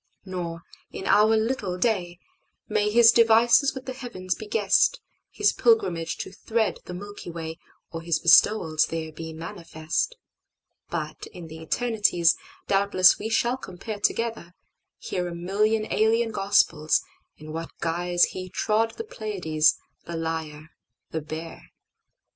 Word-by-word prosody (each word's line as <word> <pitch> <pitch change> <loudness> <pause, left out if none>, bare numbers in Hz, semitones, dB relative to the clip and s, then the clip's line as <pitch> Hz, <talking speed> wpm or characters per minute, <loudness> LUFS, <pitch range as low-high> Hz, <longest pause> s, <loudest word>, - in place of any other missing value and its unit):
Nor, 170 -3 -5 0.3
in 190 - -7
our 215 +2 +4
little 220 -5 -1
day, 180 -5 0 0.5
May 210 0 +1
His 230 +1 +7
devices 235 +4 +5
with 265 0 -7
the 260 - -5
heavens 235 -8 -4
be 215 - -9
guessed, 210 - +2 0.3
His - - +1
pilgrimage 405 - +1
to - - -7
thread 220 -2 -1
the 180 - -7
Milky 205 0 -8
WayOr 165 -1 -6 0.5
His 165 -1 +1
bestowals 165 -2 +4
there 160 -1 -4
be 160 +1 -8
manifest. 165 - -4 0.7
But - - -5
in 175 -2 -10
the 160 +1 -9
eternities, 205 -3 +2 0.3
Doubtless 195 -2 +4
we 220 - -4
shall 240 +3 +1
compare 205 -1 -7
together, 225 -5 -2 0.4
hearA 180 -2 -4
million 210 +5 0
alien 225 +1 +2
Gospels, 195 -7 +2 0.3
in 155 0 -10
what 165 +1 -5
guiseHe 175 +2 0
trod 225 +1 0
the 450 - -4
Pleiades, 180 - 0 0.3
the 170 - -6
Lyre, 160 -1 -5 0.4
the 160 - -3
Bear. 160 +2 -8
185 Hz, 130 wpm, -25 LUFS, 165-220 Hz, 0.7 s, His